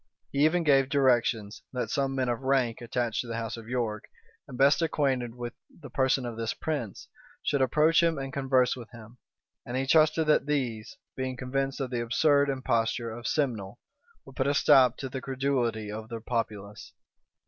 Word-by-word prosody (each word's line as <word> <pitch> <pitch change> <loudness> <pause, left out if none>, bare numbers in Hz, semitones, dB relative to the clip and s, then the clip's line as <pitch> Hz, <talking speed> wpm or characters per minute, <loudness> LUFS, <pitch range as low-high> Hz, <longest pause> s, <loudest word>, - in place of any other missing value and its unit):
He 140 +1 +1
even 170 +2 +2
gave 135 -3 +4
directions, 120 -6 +1
that 125 - -3
some 135 -1 0
men 130 -1 0
of 120 +1 -1
rank, 130 -4 +1
attached 120 -1 -1
to 125 - -9
the 115 0 -4
house 115 -2 -4
of 115 -1 -11
York, 115 -4 -2 0.4
and 125 - -9
best 140 +5 +4
acquainted 130 -7 0
with 120 -1 -6 0.2
the 150 - -13
person 130 -1 +1
of 120 -2 -5
this 115 -1 -2
prince, 145 -10 -4 0.4
should 140 -2 +1
approach 150 +6 +4
him 165 -2 +2
and 135 -1 -5
converse 130 -2 +2
with 120 -3 -10
him: 115 0 -14 0.4
and 120 - -4
he 135 - 0
trusted 155 +2 +4
that 150 -1 +3
these, 130 +1 -2 0.2
being 130 -1 -3
convinced 135 +2 -2
of 130 -2 -3
the 120 -1 -1
absurd 140 +4 +3
imposture 115 -3 -1
of 120 +1 -6
Simnel, 120 -9 -1 0.5
would 135 - -14
put 130 - 0
a 145 - +1
stop 130 -4 +5
to 135 - -5
the 130 0 -6
credulity 125 -6 -1
of 110 +1 -7
the 115 -1 -5
populace. 110 -3 -4
130 Hz, 185 wpm, -28 LUFS, 115-140 Hz, 0.5 s, stop